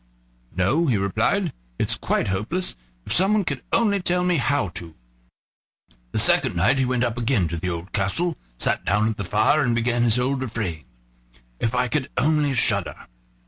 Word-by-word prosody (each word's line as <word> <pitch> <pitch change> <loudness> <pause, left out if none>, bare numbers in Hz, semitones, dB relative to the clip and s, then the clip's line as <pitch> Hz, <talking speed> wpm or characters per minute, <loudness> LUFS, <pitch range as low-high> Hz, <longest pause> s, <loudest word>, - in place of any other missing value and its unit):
"No," 130 - +2
he 120 -6 +2
replied, 100 -1 0 0.2
"it's - - +1
quite - - -1
hopeless; 110 - -2 0.3
if - - +1
someone 200 +3 +3
could 140 -7 -3
only 205 -4 +2
tell 180 0 0
me 180 -2 +2
how 135 -6 0
to!" 85 -1 -9 1.2
The - - -3
second - - +3
night 135 - +2
he 130 - +2
went 125 -1 0
up 120 0 -1
again 115 -7 +1
to 85 - -3
the 90 +3 -3
old 85 +2 -6
castle, 155 - 0 0.2
sat - - +1
down 105 +3 +1
at 110 - -4
the 100 - -3
fire, 110 - +2
and 120 -4 +1
began 120 +1 +1
his 120 -1 +3
old 130 +2 0
refrain: 105 -10 -4 0.7
"If 115 +1 -1
I 125 0 +1
could 140 +1 -1
only 150 -2 +2
shudder!" 100 -6 +1
120 Hz, 180 wpm, -23 LUFS, 100-150 Hz, 1.2 s, someone